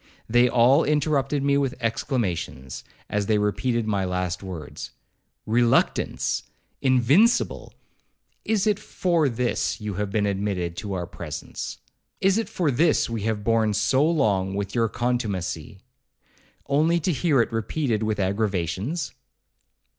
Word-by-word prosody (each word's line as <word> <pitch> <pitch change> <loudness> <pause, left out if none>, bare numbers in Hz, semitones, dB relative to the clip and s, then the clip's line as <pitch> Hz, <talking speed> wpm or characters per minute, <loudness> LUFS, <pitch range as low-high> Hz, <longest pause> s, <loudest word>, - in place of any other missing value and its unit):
They 120 +2 +4
all 125 +5 +5
interrupted 145 -2 +1
me 140 0 +3
with 135 -2 -1
exclamations, 100 - -2 0.2
as 105 -1 -1
they 110 - +3
repeated 110 +3 0
my 100 -3 0
last 90 -1 -2
words,—'Reluctance! 100 +6 -1 0.4
invincible! 135 - +3 0.7
Is 220 -2 +1
it 210 -2 +2
for 170 -8 +1
this 120 +1 -1
you 105 -1 -4
have 105 +1 -2
been 105 +1 0
admitted 95 -4 -2
to 100 -2 -4
our 90 -2 -2
presence? 80 -3 -6 0.4
Is 195 +3 +3
it 225 - -3
for 165 -6 0
this 150 -1 +2
we 115 -2 -2
have 105 -2 -2
borne 110 -1 +2
so 105 +7 +2
long 105 - +1
with 100 -1 -3
your 115 -2 +1
contumacy, 115 -7 -2 0.9
only 155 +5 +2
to 175 +3 0
hear 155 -3 +2
it 115 - +1
repeated 115 +1 -1
with 110 -1 -1
aggravations?' 100 - -1
115 Hz, 130 wpm, -24 LUFS, 100-140 Hz, 0.9 s, all